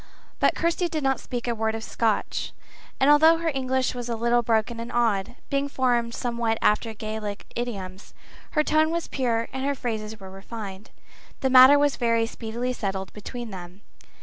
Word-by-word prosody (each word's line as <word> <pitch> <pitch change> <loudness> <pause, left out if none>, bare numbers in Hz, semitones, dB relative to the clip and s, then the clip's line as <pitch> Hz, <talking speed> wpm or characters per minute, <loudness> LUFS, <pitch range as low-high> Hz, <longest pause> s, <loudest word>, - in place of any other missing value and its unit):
But - - +3
Kirsty 340 +1 0
did 310 -2 -3
not 270 0 +1
speak 245 -1 -5
a 240 - +1
word 220 0 -1
of 225 - -5
Scotch, 225 -2 -1 0.5
and 270 - +4
although 315 +3 +6
her 330 -1 -1
English 260 -1 0
was 245 -1 -5
a 235 - -1
little 235 +1 +2
broken 230 0 0
and 235 +1 -6
odd, 230 -2 0 0.2
being 280 0 0
formed 240 -3 0
somewhat 235 -2 -1
after 215 +2 +2
Gaelic 215 -1 -5
idioms, 195 -6 -5 0.4
her 305 - +3
tone 310 +1 +3
was 335 0 -2
pure 230 -4 -1
and 265 0 -3
her 280 +1 0
phrases 220 -4 -4
were 190 -1 -10
refined. 195 0 -8 0.5
The 265 - +1
matter 260 +2 +9
was 290 -1 +2
very 230 -1 +2
speedily 235 +2 -4
settled 195 -4 -4
between 235 +2 -7
them. 180 +1 -9
235 Hz, 175 wpm, -25 LUFS, 220-265 Hz, 0.5 s, matter